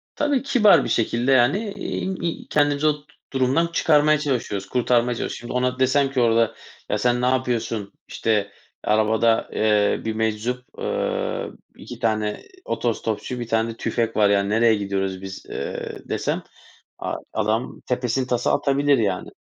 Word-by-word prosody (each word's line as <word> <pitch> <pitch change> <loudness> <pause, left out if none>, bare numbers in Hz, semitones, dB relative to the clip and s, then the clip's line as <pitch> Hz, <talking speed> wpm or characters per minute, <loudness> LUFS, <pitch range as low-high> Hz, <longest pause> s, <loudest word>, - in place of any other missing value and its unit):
Tabii, 290 -3 +1
kibar 235 -7 +5
bir - - -3
şekilde, 120 +3 +1
yani, 125 +8 +4 0.2
eee, - - -4
ııı, 170 -3 -3
kendimizi 145 0 +2
o 150 - +4 0.4
durumdan 135 +6 +2
çıkarmaya 155 -2 +3
çalışıyoruz, 115 -9 -2
kurtarmaya 125 -1 +2
çalışıyoruz. - - -4
Şimdi 120 +1 -7
ona 125 0 0
desem 135 +1 +3
ki 135 - -1
"Orada, 115 -1 +3 0.3
ya, - - +1
sen 125 0 +1
ne - - +1
yapıyorsun, 120 -5 -1
işte, 105 -3 0 0.3
arabada, 110 +1 +2
eee, 105 -1 +2
bir 110 - -1
meczup, 110 +3 -1
eee, - - -2 0.2
2 - - -10
tane 110 -2 -1 0.2
otostopçu, 115 +1 -2
1 120 - -4
tane 115 0 0
tüfek 115 -1 -1
var. 105 -1 +4
Ya, 100 -1 +3
nereye 110 +3 +3
gidiyoruz 95 -2 -2
biz, 95 0 -8
eee?" 70 - -5
desem - - -1 0.6
a - - -3 0.2
adam 110 +2 -1
tepesinin 125 0 0
tası 125 -1 0
atabilir, 140 0 +2
yani. 100 -5 -1
120 Hz, 150 wpm, -23 LUFS, 110-135 Hz, 0.6 s, kibar